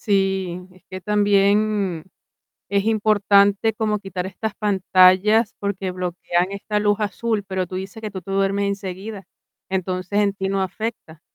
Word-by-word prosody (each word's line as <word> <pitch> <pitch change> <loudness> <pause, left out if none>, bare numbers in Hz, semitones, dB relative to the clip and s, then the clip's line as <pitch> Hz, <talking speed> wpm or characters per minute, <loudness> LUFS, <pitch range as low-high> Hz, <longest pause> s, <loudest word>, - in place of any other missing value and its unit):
Sí, 195 -3 0
es 185 - -21
que 185 - -6
también, 205 -3 +2 0.6
es 200 0 +1
importante 205 -1 +3
como 215 -1 -1
quitar 185 -2 -5
estas 200 +3 -4
pantallas, 200 +2 +4
porque 195 -2 -3
bloquean 180 0 -1
esta 210 +1 -2
luz 205 0 +2
azul, 215 0 -1
pero 190 -2 -3
tú 185 - -5
dices 195 +4 -7
que 215 - -4
tú 190 -1 -6
te 195 +3 -7
duermes 195 +1 +1
enseguida, 195 0 -5 0.4
entonces 185 +1 -2
en 205 -1 +3
ti 195 -1 -3
no 195 0 0
afecta. 190 -4 -5
195 Hz, 150 wpm, -22 LUFS, 185-210 Hz, 0.6 s, pantallas